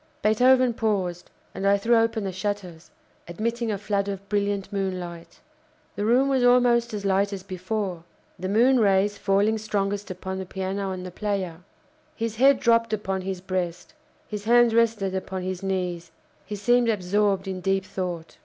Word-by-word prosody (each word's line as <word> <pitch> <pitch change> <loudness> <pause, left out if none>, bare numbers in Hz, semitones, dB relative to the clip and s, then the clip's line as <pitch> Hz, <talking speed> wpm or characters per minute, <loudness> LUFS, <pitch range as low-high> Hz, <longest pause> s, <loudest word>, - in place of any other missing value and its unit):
Beethoven 250 +3 +4
paused, 190 -6 -2 0.2
and 195 - -2
I 200 0 +5
threw 230 +4 +2
open 225 -1 +2
the 195 - -2
shutters, 185 -3 -5 0.4
admitting 230 +6 -2
a 205 - -1
flood 200 0 -1
of 200 0 -5
brilliant 205 -1 -1
moonlight. 180 -4 -4 0.6
The 205 - -2
room 250 +5 +4
was 265 -2 +2
almost 245 -1 +4
as 205 -2 -5
light 195 +1 +2
as 195 -2 -6
before, 185 -1 -4 0.4
the 185 +1 -3
moon 245 +5 +4
rays 200 -1 +2
falling 205 +3 +2
strongest 205 -1 -2
upon 190 +1 -5
the 190 - -4
piano 190 +1 -3
and 185 -1 -5
the 180 - -7
player. 190 -4 -3 0.6
His 225 -3 -3
head 270 +2 +5
dropped 230 -1 +3
upon 195 -3 -2
his 185 -1 -4
breast; 180 - -4 0.3
his 210 -1 -6
hands 240 0 +5
rested 225 -4 +2
upon 190 0 -4
his 185 -1 -4
knees; 180 -3 -3 0.4
he 210 - -4
seemed 240 +3 +2
absorbed 200 -1 +1
in 185 -1 -4
deep 195 +1 0
thought. 175 -4 -5
200 Hz, 165 wpm, -25 LUFS, 185-220 Hz, 0.6 s, I